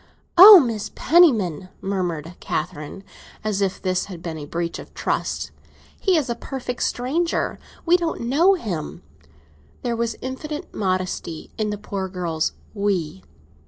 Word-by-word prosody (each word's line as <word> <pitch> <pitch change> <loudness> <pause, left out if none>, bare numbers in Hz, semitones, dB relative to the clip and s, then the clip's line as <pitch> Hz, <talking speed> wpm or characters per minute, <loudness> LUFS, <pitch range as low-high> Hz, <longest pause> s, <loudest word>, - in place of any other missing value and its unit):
"Oh, 370 - +11
Aunt 215 -3 -5
Penniman!" 220 - +3
murmured 175 -4 -3
Catherine, 155 +5 -4 0.4
as 210 -2 -1
if 195 -1 0
this 185 -1 -1
had 175 -4 -10
been 160 -2 -5
a 145 - -8
breach 170 +1 -3
of - - -11
trust. - - -2 0.5
"He 380 -3 +3
is 300 - 0
a 240 - -1
perfect 250 0 -6
stranger—we 330 +5 0
don't 335 -2 -3
know 310 +11 +4
him." 180 - -5 0.8
There 240 -1 -1
was 230 -1 -1
infinite, 295 +4 -6
modesty 185 -4 -3
in 215 -1 -1
the 210 - -3
poor 195 -2 -4
girl's 170 -4 -2 0.2
"we." 190 -5 -1
205 Hz, 135 wpm, -22 LUFS, 180-260 Hz, 0.8 s, Oh